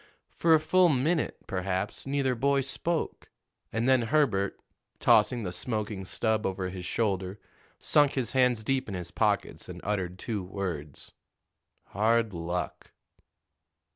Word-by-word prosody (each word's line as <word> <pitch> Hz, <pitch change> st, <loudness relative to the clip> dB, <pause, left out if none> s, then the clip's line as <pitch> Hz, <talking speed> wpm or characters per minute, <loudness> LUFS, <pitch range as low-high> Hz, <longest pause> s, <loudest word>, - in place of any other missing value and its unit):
For 165 Hz, -1 st, +4 dB
a -, -, +4 dB
full 180 Hz, +3 st, +4 dB
minute, 150 Hz, +4 st, +1 dB
perhaps, 95 Hz, +5 st, -3 dB
neither 135 Hz, -2 st, +1 dB
boy 140 Hz, +3 st, +2 dB
spoke; 160 Hz, +5 st, -2 dB, 0.4 s
and 115 Hz, +2 st, 0 dB
then 130 Hz, -1 st, +5 dB
Herbert, 115 Hz, -6 st, +1 dB, 0.4 s
tossing 120 Hz, -2 st, +4 dB
the 90 Hz, -, -3 dB
smoking 105 Hz, 0 st, -3 dB
stub 110 Hz, +3 st, 0 dB
over 95 Hz, -2 st, -2 dB
his 90 Hz, -1 st, -7 dB
shoulder, 95 Hz, -2 st, -1 dB, 0.4 s
sunk 145 Hz, -2 st, +4 dB
his 125 Hz, -4 st, -1 dB
hands 125 Hz, -4 st, +2 dB
deep 130 Hz, 0 st, 0 dB
in 100 Hz, -, -4 dB
his 90 Hz, -1 st, -5 dB
pockets -, -, 0 dB
and -, -, -7 dB
uttered 95 Hz, -3 st, -2 dB
two 105 Hz, -1 st, -3 dB
words: 90 Hz, -6 st, -5 dB, 0.8 s
"Hard 115 Hz, +1 st, +2 dB
luck." 85 Hz, +1 st, -4 dB
110 Hz, 135 wpm, -28 LUFS, 95-135 Hz, 0.8 s, then